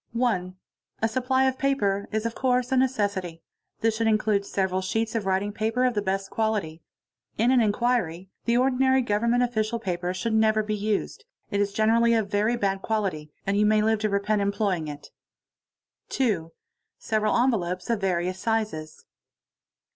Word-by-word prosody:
1. 200 -7 0 0.5
A - - +5
supply 255 +3 +1
of 260 -1 0
paper 205 -8 0
is 220 +1 -1
of 230 - -1
course 250 -1 0
a - - +3
necessity. 205 -10 0 0.4
This 225 -1 +2
should 225 0 0
include 215 -2 +2
everal 190 -2 -1
sheets 220 +4 -1
of 220 -4 -2
writing 195 +2 0
paper 225 +4 0
of 250 - +2
the 205 - 0
best 195 0 -2
quality. 210 -8 -1 0.6
In 235 +4 +3
an 255 -2 +5
inquiry 205 -5 0
'. - - -7
ordinary 260 +2 +3
Government 235 +3 +1
official 235 -1 -1
paper 180 -5 -3
should 220 +5 -2
never 220 0 +3
be 215 0 -2
used, 210 0 -2 0.3
it 200 - 0
is 200 0 0
g 215 - 0
enerally 230 +1 +4
of 205 -2 -4
very 210 +4 +2
bad 195 -4 -1
quality, 190 -10 -2
and 195 +1 0
you 210 - +3
may 215 0 +3
live 220 0 +2
to 215 0 0
repent 205 +1 0
employing 200 -5 0
it. 145 -1 -9 0.5
| - - -58
2. 195 -11 0 0.5
Several 215 -1 0
envelopes 185 -8 0
of 225 -3 -1
various 185 0 -1
sizes. 210 -8 -3
215 Hz, 170 wpm, -26 LUFS, 195-235 Hz, 0.6 s, A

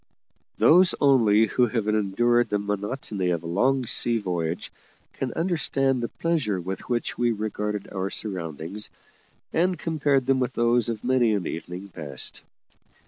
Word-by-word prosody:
Those 180 +3 +6
only 115 -6 +5
who 120 +3 +2
have 110 -2 -2
endured 110 +3 +2
the 105 - +1
monotony 105 -1 -3
of 85 -2 -1
a - - -9
long 125 +10 +1
sea 120 0 +2
voyage 85 -5 -3 0.4
can 130 -2 -3
understand 140 -7 0
the 120 - -1
pleasure 145 - -1
with 95 +6 -6
which 120 -1 -2
we 120 -1 +3
regarded 105 -1 -3
our 95 0 -2
surroundings, 90 0 -4 0.6
and 180 +2 +2
compared 145 -5 +1
them 135 0 +2
with 125 -2 -1
those 120 0 +2
of 110 -2 -4
many 120 -3 +3
an 95 -4 -2
evening 90 +4 -6
past. 75 -8 -5
110 Hz, 145 wpm, -25 LUFS, 95-130 Hz, 0.6 s, Those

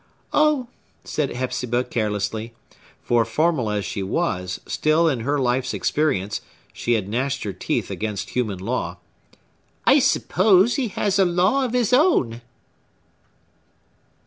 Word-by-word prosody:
"Oh!" 300 -4 +3 0.4
said 150 -3 -2
Hepzibah 125 -1 -2
carelessly,—for, 110 +1 -3
formal 135 0 0
as 105 -1 -1
she 100 - -4
was, 90 -1 -2
still, 155 +2 +2
in 135 -6 +1
her 140 +6 0
life's 130 0 0
experience, 105 -10 0 0.3
she 120 - -1
had 105 -4 0
gnashed 130 +5 -2
her 100 - -4
teeth - - -2
against 105 -2 -4
human 110 -6 -1
law,—"I 90 -4 -3
suppose 190 +3 +3
he 265 -4 0
has 200 0 -1
a 190 - +5
law 185 +10 +2
of 245 - -4
his 250 -1 +1
own!" 190 - +3
125 Hz, 120 wpm, -22 LUFS, 110-175 Hz, 0.4 s, a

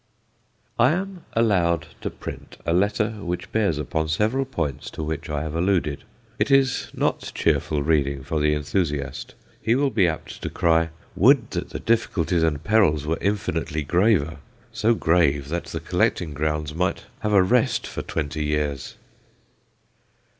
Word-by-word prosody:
I 125 +5 +5
am 190 0 -4
allowed 90 -8 +2 0.2
to - - -2
print - - -9
a 85 - +1
letter 105 +4 +2
which 90 -1 -4
bears 100 -8 +1
upon 80 +2 -2
several 110 +12 +1
points 80 - -3
to 80 - -6
which 80 +1 -4
I 75 0 -2
have 80 -1 -4
alluded. 85 -4 0 0.3
It - - +1
is 135 -2 +3
not - - -1
cheerful 75 -2 +1
reading 70 -3 +1
for 80 +2 -2
the 75 0 +2
enthusiast. 75 -3 -2 0.3
He 115 +1 +2
will 140 +1 +2
be 95 -7 +3
apt 80 -2 -5
to - - -3
cry, 80 -1 +2 0.3
"Would 130 - +4
that - - -3
the - - -5
difficulties 90 -7 +1
and 80 -2 0
perils 90 -8 +3
were 80 +2 -1
infinitely 80 -6 -1
graver 85 -2 +2 0.3
so 115 +2 +2
grave 75 -7 +2
that 85 +2 -2
the - - -5
collecting 80 -4 0
grounds 75 0 -2
might 90 +4 -1
have 105 - -1
a 95 -2 +6
rest 120 +5 +2
for - - -5
twenty 75 0 -3
years!" 75 -2 -2
80 Hz, 155 wpm, -24 LUFS, 75-105 Hz, 0.3 s, a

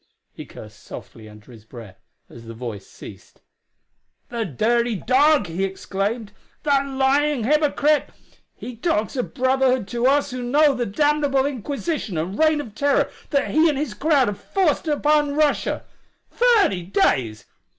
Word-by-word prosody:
He - - -10
cursed - - -13
softly 110 -1 -11
under 105 +3 -16
his 110 -3 -14
breath 110 -4 -13 0.3
as 115 -1 -14
the 115 0 -9
voice 110 -4 -7
ceased. - - -14 0.9
"The 235 -2 -3
dirty 235 - 0
dog!" 280 +8 +3
he 175 +3 -3
exclaimed. 200 +3 -3 0.3
"The 295 - 0
lying 275 0 +1
hypocrite! 300 +1 +2 0.5
He 250 - -8
talks 230 -2 -1
of 250 - -4
brotherhood 260 -3 +1
to 240 +1 0
us 285 0 +2
who 250 0 -5
know 285 +4 +3
the 245 -2 -2
damnable 290 +3 +1
inquisition 280 - -3
and 175 +6 -4
reign 310 -1 +3
of 230 -8 -7
terror 280 +6 +1 0.2
that 280 -2 0
he 315 +2 +4
and 290 - -1
his 280 -6 -3
crowd 280 +3 +2
have 205 -1 -4
forced 340 -5 0
on 295 -1 +1
Russia! 300 -1 0 0.5
Thirty 445 - +3
days! 120 - 0
260 Hz, 150 wpm, -22 LUFS, 195-295 Hz, 0.9 s, he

